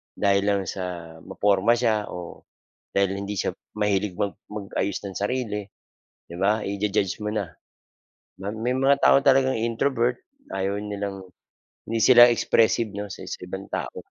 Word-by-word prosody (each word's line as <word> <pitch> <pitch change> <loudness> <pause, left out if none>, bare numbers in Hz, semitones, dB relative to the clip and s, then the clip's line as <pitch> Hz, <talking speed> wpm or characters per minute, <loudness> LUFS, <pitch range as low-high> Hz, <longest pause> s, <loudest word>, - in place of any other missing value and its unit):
dahil 100 0 +2
lang 100 -1 +2
sa 85 -3 -6
maporma 105 +2 +2
siya 110 -3 +1
o, 90 -1 -8 0.5
dahil 100 0 +2
hindi 100 +1 -4
siya - - -1 0.2
mahilig 105 -2 0
mag 100 +2 -1
mag-ayos 100 -1 -3
ng 95 -2 -6
sarili, 105 -1 -2 0.6
'di 85 - -8
ba 105 +3 +2
i-ju-judge 100 0 -1
mo 105 - -1
na. 105 -3 -1 0.9
Ma 100 +1 -3
may 115 +3 -1
mga 135 +1 +4
tao - - +7
talagang 135 -1 +4
introvert 120 +2 0 0.3
ayaw 95 +1 -1
nilang 100 -2 -4 0.7
hindi 115 - 0
sila 120 -1 +9
expressive 115 -1 +2
'no, 105 0 -4
sa - - -8
sa - - -6
ibang 95 +2 -7
tao. - - -3
105 Hz, 150 wpm, -25 LUFS, 100-115 Hz, 0.9 s, sila